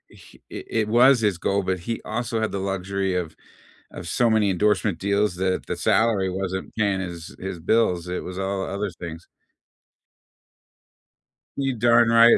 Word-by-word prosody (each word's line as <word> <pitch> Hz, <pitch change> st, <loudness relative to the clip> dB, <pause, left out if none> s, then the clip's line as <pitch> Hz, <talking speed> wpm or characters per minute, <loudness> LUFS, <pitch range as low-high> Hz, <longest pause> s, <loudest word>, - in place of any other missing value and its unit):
he -, -, -18 dB
it -, -, -7 dB
it 110 Hz, -2 st, 0 dB
was 125 Hz, +3 st, +5 dB
his 105 Hz, -5 st, +1 dB
goal, 100 Hz, +2 st, 0 dB
but 95 Hz, -1 st, -1 dB
he 115 Hz, +6 st, -4 dB
also 120 Hz, -1 st, -2 dB
had 110 Hz, -, -1 dB
the 100 Hz, -, -3 dB
luxury 95 Hz, 0 st, -2 dB
of 80 Hz, -3 st, -3 dB, 0.6 s
of 90 Hz, -, -8 dB
so 120 Hz, +6 st, +2 dB
many 110 Hz, -2 st, +3 dB
endorsement 105 Hz, 0 st, +1 dB
deals 100 Hz, -1 st, +1 dB
that 95 Hz, 0 st, -1 dB
the -, -, -3 dB
salary 105 Hz, -5 st, +2 dB
wasn't 95 Hz, 0 st, -4 dB
paying 100 Hz, -3 st, +1 dB
his 85 Hz, -3 st, -7 dB
his 95 Hz, -2 st, -5 dB
bills. 90 Hz, -2 st, +1 dB
It 90 Hz, -, -3 dB
was 90 Hz, 0 st, -7 dB
all 95 Hz, 0 st, -2 dB
the -, -, -5 dB
other 100 Hz, +1 st, -2 dB
things. 85 Hz, -1 st, -8 dB, 2.3 s
You 135 Hz, -2 st, 0 dB
darn 120 Hz, +1 st, +4 dB
right 115 Hz, 0 st, +7 dB
100 Hz, 170 wpm, -24 LUFS, 90-110 Hz, 2.3 s, right